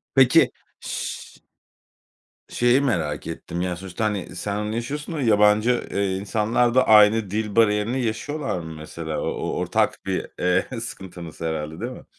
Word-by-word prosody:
Peki, 130 -2 +6 0.3
ş - - -4 1.3
şeyi 120 +3 +3
merak 80 - -1
ettim 85 - -5
ya 90 0 -1
sonuçta, 95 +4 -4
hani, 100 -4 -3
sen 100 +3 -3
onu 105 +1 -3
yaşıyorsun 145 +7 -4
da 150 - -2
yabancı, 105 +1 +3
eee, 100 -1 0
insanlar 110 +5 +1
da 130 - +4
aynı 105 -1 +6
dil 105 -1 -2
bariyerini 110 +3 +2
yaşıyorlar 135 - -2
mı 80 -1 -7
mesela? 80 0 -5
O - - -3
o - - -3
ortak - - 0
bir, - - -2
eee, 90 +7 0
sıkıntınız 90 -8 -8
herhâlde, 80 0 -3
değil 120 +3 -4
mi? - - -11
105 Hz, 155 wpm, -23 LUFS, 90-120 Hz, 1.3 s, Peki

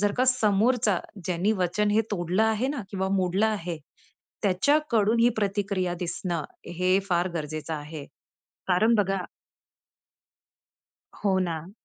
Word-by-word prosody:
जर 205 0 +2
का 255 - +4
समोरचा 220 -3 +3 0.3
ज्यानी 180 +4 +1
वचन 195 +1 0
हे 215 - +4
तोडलं 180 +1 0
आहे 220 +3 +1
ना 275 -5 -3
किंवा 190 -1 -1
मोडलं 190 +3 +2
आहे, 180 -6 -2 0.6
त्याच्याकडून 225 +2 +2
ही 235 - +6
प्रतिक्रिया 200 -3 -1
दिसणं 175 -2 -3 0.3
हे 185 +1 +3
फार 175 0 +2
गरजेचं 155 0 -4
आहे. 150 0 -7 0.6
कारण 215 +6 +4
बघा 195 -3 +1 2.0
हो 190 -2 +3
ना. 170 -2 -3
195 Hz, 120 wpm, -26 LUFS, 175-220 Hz, 2.0 s, ही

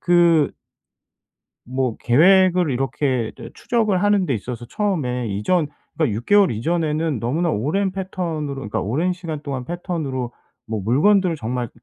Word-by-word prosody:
그 170 -3 +4 1.1
뭐 130 -2 -2
계획을 180 +5 +4
이렇게 130 -2 -1
저 - - -9
추적을 215 -6 0
하는 205 -2 +3
데 135 - 0
있어서 120 +2 -6
처음에 125 - -1
이전 145 - 0 0.3
그러니까 150 -10 0
6 120 - -6
개월 205 -2 +5
이전에는 155 +2 -1
너무나 160 +9 0
오랜 185 - 0
패턴으로 170 -6 -3
그러니까 110 -6 -3
오랜 155 - 0
시간 165 -4 -6
동안 135 -3 -4
패턴으로 145 -7 -4 0.3
뭐 110 -2 -3
물건들을 170 - +3
정말 120 -1 -3
150 Hz, 320 characters per minute, -21 LUFS, 125-180 Hz, 1.1 s, 개월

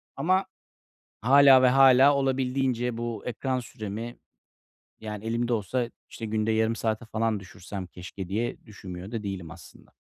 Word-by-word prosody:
Ama 185 +7 +1 0.8
hâlâ 135 +2 +7
ve 130 - +6
hâlâ 135 +1 +6
olabildiğince 130 -3 0
bu 115 -2 -4
ekran 130 +1 -2
süremi, 110 0 -7 0.8
yani, 105 -1 -6
elimde 120 +1 -1
olsa 115 +3 -1 0.2
işte 115 - -6
günde 110 +1 0
yarım 110 +1 +1
saate 110 +1 -2
falan 110 -1 -1
düşürsem 95 0 -8
keşke 90 +1 -9
diye 115 +6 -3
düşünmüyor 95 -1 -9
da 115 - -3
değilim 95 -5 -5
aslında. 85 +1 -15
115 Hz, 140 wpm, -27 LUFS, 105-130 Hz, 0.8 s, hâlâ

